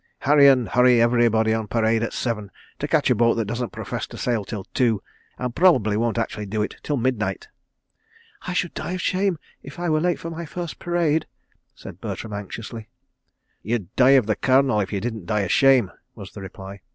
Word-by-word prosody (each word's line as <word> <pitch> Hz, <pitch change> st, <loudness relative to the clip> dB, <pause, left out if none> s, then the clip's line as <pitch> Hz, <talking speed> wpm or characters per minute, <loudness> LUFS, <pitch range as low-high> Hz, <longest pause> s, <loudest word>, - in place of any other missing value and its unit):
Harry 145 Hz, 0 st, +6 dB
and 130 Hz, -4 st, +4 dB
hurry 125 Hz, -1 st, +4 dB
everybody 115 Hz, -2 st, +3 dB
on 110 Hz, -1 st, -2 dB
parade 115 Hz, 0 st, +1 dB
at 115 Hz, -, -2 dB
seven, 105 Hz, -5 st, -3 dB, 0.3 s
to -, -, -2 dB
catch -, -, +2 dB
a -, -, +7 dB
boat 115 Hz, +1 st, +3 dB
that 115 Hz, -2 st, -1 dB
doesn't 120 Hz, +3 st, -3 dB
profess -, -, -5 dB
to -, -, -11 dB
sail 115 Hz, -4 st, -1 dB
till 100 Hz, -1 st, -6 dB
two, 115 Hz, -6 st, +1 dB, 0.3 s
and 125 Hz, -1 st, -3 dB
probably 130 Hz, -, +4 dB
won't 115 Hz, +1 st, 0 dB
actually 110 Hz, -2 st, -3 dB
do 105 Hz, +2 st, -1 dB
it -, -, -4 dB
till 145 Hz, -, -2 dB
midnight." 110 Hz, -6 st, -2 dB, 1.0 s
"I 180 Hz, -, -2 dB
should 180 Hz, -1 st, -1 dB
die 175 Hz, -, -4 dB
of 185 Hz, -, -3 dB
shame 185 Hz, -1 st, +1 dB, 0.2 s
if 140 Hz, +4 st, -11 dB
I 175 Hz, 0 st, -2 dB
were 155 Hz, 0 st, +2 dB
late 175 Hz, 0 st, +1 dB
for 165 Hz, -, -7 dB
my 165 Hz, 0 st, -6 dB
first 175 Hz, +1 st, -6 dB
parade," 170 Hz, -3 st, 0 dB, 0.5 s
said -, -, -11 dB
Bertram 110 Hz, -, -5 dB
anxiously. 110 Hz, +2 st, -7 dB, 0.7 s
"You'd 110 Hz, -1 st, -3 dB
die 135 Hz, +1 st, +6 dB
of 125 Hz, -, +2 dB
the 110 Hz, -1 st, 0 dB
Colonel, 130 Hz, -3 st, +3 dB
if 100 Hz, -, -2 dB
you 100 Hz, -, -1 dB
didn't 110 Hz, -5 st, -5 dB
of 105 Hz, -3 st, 0 dB
shame," 130 Hz, -7 st, +4 dB, 0.2 s
was 100 Hz, -3 st, -10 dB
the 100 Hz, -, -10 dB
reply. 95 Hz, +1 st, -9 dB
115 Hz, 200 wpm, -23 LUFS, 105-140 Hz, 1.0 s, a